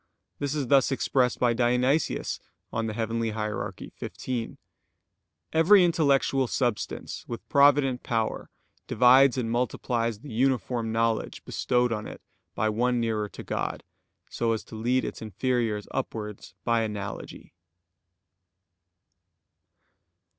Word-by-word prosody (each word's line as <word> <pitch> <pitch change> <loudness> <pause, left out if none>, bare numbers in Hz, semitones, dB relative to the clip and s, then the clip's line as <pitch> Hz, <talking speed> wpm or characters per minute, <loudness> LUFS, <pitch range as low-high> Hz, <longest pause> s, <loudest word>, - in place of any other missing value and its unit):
This 145 +1 -2
is 145 -3 -1
thus 135 +2 +4
expressed 130 -1 +1
by 120 -1 +2
Dionysius 125 +5 +1 0.3
(Coel. 115 -1 -2
Hier. 110 -1 -2 0.3
xv): 120 -3 -4 1.0
"Every 180 +4 +6
intellectual 140 -5 +2
substance 120 -3 -2
with 120 - -7
provident 140 -2 +4
power 115 -2 -2 0.4
divides 130 +1 +6
and 115 -3 -1
multiplies 115 -2 -1
the 145 - -9
uniform 120 -2 0
knowledge 115 0 -1
bestowed 125 -1 +1
on 105 -1 -4
it - - -9 0.4
by 110 - +1
one 120 +3 +1
nearer 110 -3 -1
to - - -9
God, - - -3 0.4
so 115 -1 0
as 110 - -3
to - - -11
lead 120 +4 +1
its - - -6
inferiors 110 0 -1
upwards 105 -2 -5
by 115 -1 +2
analogy." 105 -2 -6
120 Hz, 110 wpm, -27 LUFS, 110-130 Hz, 1.0 s, Every